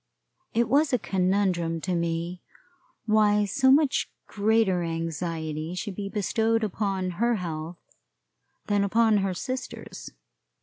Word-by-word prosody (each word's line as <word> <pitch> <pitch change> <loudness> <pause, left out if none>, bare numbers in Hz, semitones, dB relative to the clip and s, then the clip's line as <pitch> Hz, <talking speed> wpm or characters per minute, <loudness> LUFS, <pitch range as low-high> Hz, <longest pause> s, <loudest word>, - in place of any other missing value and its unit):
It 235 0 +3
was 285 +4 +3
a 250 - +3
conundrum 185 -4 0
to 185 - -2
me 170 +1 -2 0.6
why 210 -1 +3
so 265 +6 +2
much 285 0 +3 0.2
greater 210 -3 +2
anxiety 165 -1 -3
should 200 +2 -4
be 200 0 -4
bestowed 225 +2 0
upon 195 -3 -1
her 240 0 +3
health 165 -3 -5 0.9
than 205 -1 +1
upon 220 +1 +3
her 195 -2 0
sister's. 255 +7 -6
195 Hz, 120 wpm, -26 LUFS, 175-220 Hz, 0.9 s, It